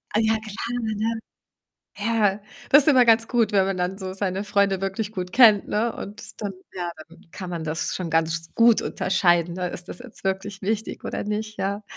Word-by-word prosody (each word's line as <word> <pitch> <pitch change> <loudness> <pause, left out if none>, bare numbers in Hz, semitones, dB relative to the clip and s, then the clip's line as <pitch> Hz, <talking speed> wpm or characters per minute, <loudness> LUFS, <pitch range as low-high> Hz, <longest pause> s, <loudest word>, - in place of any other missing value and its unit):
Ah, - - +4
ja, 220 0 +3
klar, 215 -2 -9 0.3
ja, 215 - -2
ja. 225 +1 0 0.8
Ja, 210 -2 +1 0.3
das 290 +1 +8
ist 305 - +4
immer 255 -3 +6
ganz 225 0 +4
gut, 230 -4 +1
wenn 195 -1 +5
man 195 -1 -2
dann 180 +2 -2
so 190 -2 -5
seine 195 0 -1
Freunde 200 -2 +1
wirklich 200 +2 -3
gut 180 -2 -4
kennt, 220 -5 +6
ne? 225 +2 0
Und 205 +2 -9
dann 200 -1 -2 0.2
ja, 175 -2 -4 0.2
dann - - -18
kann 185 -2 -7
man 170 -2 -4
das 160 +1 -2
schon 180 -3 -4
ganz 165 +1 0
gut 230 -1 +5
unterscheiden, 175 -2 +1
ne? 180 -1 -3
Ist 175 +1 -7
das - - -8
jetzt 245 -5 -12
wirklich 195 +1 -2
wichtig, 215 +2 -3
oder - - -3
nicht? 215 +1 -4
Ja. 200 +2 -2
200 Hz, 205 wpm, -24 LUFS, 185-220 Hz, 0.8 s, das